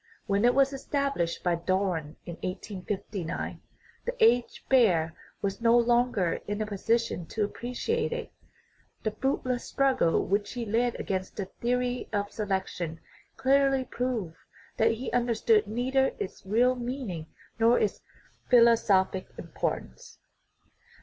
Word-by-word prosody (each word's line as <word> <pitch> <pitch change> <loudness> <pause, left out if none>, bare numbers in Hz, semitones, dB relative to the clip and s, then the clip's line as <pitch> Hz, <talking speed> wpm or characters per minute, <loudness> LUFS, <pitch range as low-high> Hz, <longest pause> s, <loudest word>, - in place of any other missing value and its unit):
When 200 +3 +2
it 245 - +4
was 275 0 +4
established 275 - -1
by 175 - +2
Darwin 170 -3 -1
in 170 - -6
1859, 190 -1 -4 0.4
the - - -2
aged 240 +1 +3
Baer 180 -12 +4 0.3
was 195 +3 -2
no 230 +1 +5
longer 240 -7 +2
in 205 +1 -2
a 215 - 0
position 215 -3 -1
to 220 - -1
appreciate 250 - -2
it; 485 - -4 0.7
the 215 - 0
fruit 265 +6 -1
less 250 -1 -1
struggle 265 -11 +2
which 205 +1 0
he 240 -2 -3
led 235 +3 0
against 190 -1 -3
the 200 - -3
theory 250 +4 -2
of 205 -1 -1
selec 195 -3 -1
tion 165 -2 -5 0.4
clearly 270 0 +3
proved 235 -10 -3 0.4
that 225 +1 +4
he 245 +4 -5
understood 230 -3 +2
neither 260 +5 +1
its 190 - -6
real 240 +5 +4
meaning 240 - -5 0.3
nor 230 +2 +5
its 210 - 0 0.5
philosophic 225 -6 +4
importance. 60 - -5
225 Hz, 130 wpm, -28 LUFS, 190-250 Hz, 0.7 s, no